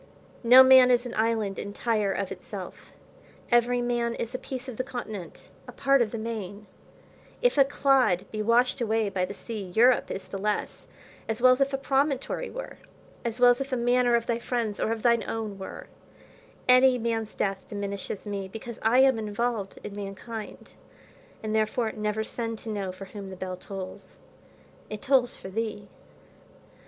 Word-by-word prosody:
No 250 Hz, +3 st, +9 dB
man 260 Hz, -1 st, +8 dB
is 245 Hz, 0 st, +3 dB
an 245 Hz, -, -6 dB
island, 220 Hz, -3 st, 0 dB
entire 210 Hz, 0 st, -1 dB
of 195 Hz, -1 st, -3 dB
itself; -, -, -8 dB, 0.6 s
every 240 Hz, +1 st, +3 dB
man 240 Hz, -1 st, 0 dB
is 230 Hz, +2 st, -4 dB
a 255 Hz, -, -3 dB
piece 260 Hz, 0 st, -6 dB
of 250 Hz, -4 st, -7 dB
the 255 Hz, -, -1 dB
continent, 220 Hz, -8 st, -7 dB, 0.2 s
a -, -, -8 dB
part 275 Hz, -1 st, +3 dB
of 230 Hz, -, +1 dB
the 230 Hz, -, -5 dB
main. 215 Hz, -2 st, -5 dB, 0.8 s
If -, -, +4 dB
a 275 Hz, -, +7 dB
clod 270 Hz, -9 st, +2 dB
be 215 Hz, -, -3 dB
washed 240 Hz, +4 st, +2 dB
away 220 Hz, -2 st, +1 dB
by 185 Hz, -2 st, -1 dB
the 200 Hz, -, -8 dB
sea, 220 Hz, +1 st, -6 dB
Europe 245 Hz, +3 st, +4 dB
is 190 Hz, -1 st, -6 dB
the 195 Hz, +1 st, -6 dB
less, 210 Hz, +1 st, -3 dB, 0.4 s
as 225 Hz, +1 st, -1 dB
well 255 Hz, +1 st, +7 dB
as 255 Hz, -, -2 dB
if 275 Hz, 0 st, +2 dB
a 270 Hz, -, 0 dB
promontory 275 Hz, -, 0 dB
were, -, -, -8 dB, 0.4 s
as 235 Hz, 0 st, -3 dB
well 245 Hz, 0 st, +7 dB
as 245 Hz, -, 0 dB
if 275 Hz, +1 st, -4 dB
a 255 Hz, -, 0 dB
manor 245 Hz, 0 st, +3 dB
of 235 Hz, -1 st, 0 dB
thy 235 Hz, -1 st, -1 dB
friend's 235 Hz, -4 st, -2 dB
or 220 Hz, -, 0 dB
of 225 Hz, -1 st, -3 dB
thine[Pg 235 Hz, -1 st, +4 dB
109] -, -, -4 dB
own 215 Hz, -3 st, -5 dB
were: 190 Hz, -, -8 dB, 0.8 s
any 255 Hz, 0 st, +6 dB
man's 225 Hz, -2 st, -2 dB
death 195 Hz, -1 st, -2 dB
diminishes 200 Hz, 0 st, -5 dB
me, 200 Hz, -2 st, -4 dB
because 225 Hz, +3 st, -8 dB
I 235 Hz, +4 st, +4 dB
am 265 Hz, -3 st, +4 dB
involved 215 Hz, -1 st, -2 dB
in 200 Hz, -, -7 dB
mankind, 205 Hz, +2 st, -7 dB, 0.7 s
and 215 Hz, 0 st, -2 dB
therefore 220 Hz, +1 st, +1 dB
never 210 Hz, 0 st, -2 dB
send 230 Hz, 0 st, -4 dB
to 225 Hz, -, -7 dB
know 200 Hz, -3 st, -3 dB
for 185 Hz, +1 st, -9 dB
whom 195 Hz, 0 st, -9 dB
the 190 Hz, -, -8 dB
bells 185 Hz, 0 st, -6 dB
tolls; 195 Hz, -2 st, -8 dB, 0.7 s
it 215 Hz, -1 st, -7 dB
tolls 260 Hz, -3 st, +2 dB
for 190 Hz, -, -9 dB
thee. 210 Hz, 0 st, -4 dB
225 Hz, 185 wpm, -27 LUFS, 205-245 Hz, 0.8 s, No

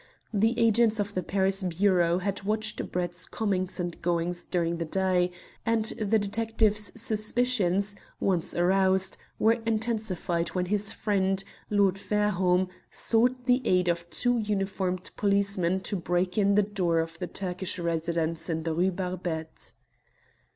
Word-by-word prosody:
The 220 Hz, +3 st, +2 dB
agents 230 Hz, -1 st, +3 dB
of 205 Hz, 0 st, -2 dB
the 185 Hz, -, -1 dB
Paris 195 Hz, +2 st, 0 dB
Bureau 180 Hz, -1 st, +2 dB
had 195 Hz, +2 st, -2 dB
watched 215 Hz, +2 st, -2 dB
Brett's 175 Hz, 0 st, -2 dB
comings 190 Hz, -4 st, -1 dB
and 175 Hz, -1 st, -4 dB
goings 175 Hz, 0 st, -1 dB
during 170 Hz, -2 st, -1 dB
the 165 Hz, -, -3 dB
day, 180 Hz, +1 st, +1 dB, 0.3 s
and 230 Hz, -1 st, +1 dB
the 220 Hz, -1 st, +1 dB
detectives' 215 Hz, 0 st, +1 dB
suspicions, 215 Hz, -3 st, +2 dB, 0.2 s
once 180 Hz, -4 st, 0 dB
aroused, 190 Hz, +1 st, +3 dB, 0.2 s
were 225 Hz, +2 st, +3 dB
intensified 215 Hz, -7 st, -1 dB
when 180 Hz, -1 st, 0 dB
his 205 Hz, +2 st, 0 dB
friend, 195 Hz, -2 st, 0 dB, 0.3 s
Lord 200 Hz, -2 st, +2 dB
Fairholme, 190 Hz, -3 st, +1 dB, 0.2 s
sought 245 Hz, +2 st, +2 dB
the 250 Hz, +1 st, +3 dB
aid 180 Hz, -5 st, +2 dB
of 170 Hz, 0 st, -2 dB
two 245 Hz, +8 st, +1 dB
uniformed 195 Hz, -3 st, -2 dB
policemen 200 Hz, -3 st, +1 dB
to 200 Hz, -, -2 dB
break 180 Hz, +1 st, -1 dB
in 200 Hz, -1 st, +3 dB
the 210 Hz, -, +5 dB
door 185 Hz, -5 st, 0 dB
of 165 Hz, 0 st, -2 dB
the 180 Hz, -, -3 dB
Turkish 185 Hz, +2 st, -3 dB
residents 165 Hz, -1 st, -1 dB
in 160 Hz, -1 st, -2 dB
the 165 Hz, -1 st, -1 dB
Rue 180 Hz, +4 st, +2 dB
Barbette. 175 Hz, -3 st, -5 dB
190 Hz, 140 wpm, -27 LUFS, 175-210 Hz, 0.3 s, the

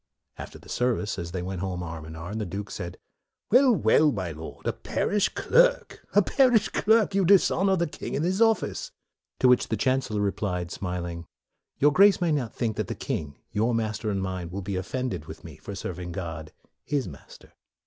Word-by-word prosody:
After -, -, -9 dB
the -, -, -17 dB
service, 120 Hz, -5 st, -1 dB
as 85 Hz, 0 st, -5 dB
they 90 Hz, -1 st, -3 dB
went 95 Hz, -1 st, -4 dB
home 90 Hz, -2 st, -3 dB
arm 80 Hz, -2 st, -7 dB
in 80 Hz, 0 st, -9 dB
arm, 90 Hz, +7 st, -5 dB
the -, -, -1 dB
Duke 100 Hz, +3 st, -5 dB
said, 90 Hz, -1 st, -6 dB, 0.5 s
"Well, 255 Hz, +3 st, +6 dB
well! 150 Hz, -, +4 dB
my 95 Hz, -8 st, -3 dB
Lord, 80 Hz, +1 st, -9 dB
a -, -, 0 dB
parish 205 Hz, -1 st, 0 dB
clerk! -, -, +2 dB
a -, -, +6 dB
parish 245 Hz, -6 st, +3 dB
clerk! 220 Hz, -1 st, +3 dB
You 195 Hz, 0 st, +3 dB
dishonor 190 Hz, +1 st, +4 dB
the 170 Hz, -2 st, +1 dB
king 155 Hz, -, -6 dB
and 150 Hz, -, 0 dB
his 190 Hz, +4 st, 0 dB
office." 225 Hz, -, +2 dB, 0.5 s
To 130 Hz, -, +6 dB
which 125 Hz, 0 st, +4 dB
the 110 Hz, -, -1 dB
Chancellor 125 Hz, -2 st, 0 dB
replied, 90 Hz, -3 st, -2 dB
smil 90 Hz, -2 st, -3 dB
ing, 85 Hz, 0 st, -7 dB, 0.3 s
" -, -, -55 dB
Your 145 Hz, +1 st, +4 dB
Grace 200 Hz, +1 st, +6 dB
may 175 Hz, -3 st, +1 dB
not 135 Hz, -7 st, -1 dB
think 115 Hz, -4 st, -2 dB
that -, -, -1 dB
the -, -, -4 dB
40 -, -, -24 dB
MORE -, -, -2 dB
king, -, -, -34 dB
your 110 Hz, +3 st, +1 dB
master 110 Hz, -1 st, -2 dB
and 100 Hz, -2 st, -1 dB
mine, 95 Hz, -2 st, -4 dB
will 95 Hz, +2 st, -5 dB
be 95 Hz, +1 st, -3 dB
of 95 Hz, +1 st, -3 dB
fended 130 Hz, -1 st, -3 dB
with -, -, -10 dB
me -, -, -10 dB
for 100 Hz, -, -8 dB
serving 90 Hz, -2 st, -5 dB
God, 80 Hz, -4 st, -6 dB, 0.3 s
his 140 Hz, -6 st, -1 dB
Master." 70 Hz, -6 st, -13 dB
105 Hz, 210 wpm, -26 LUFS, -, 0.5 s, Well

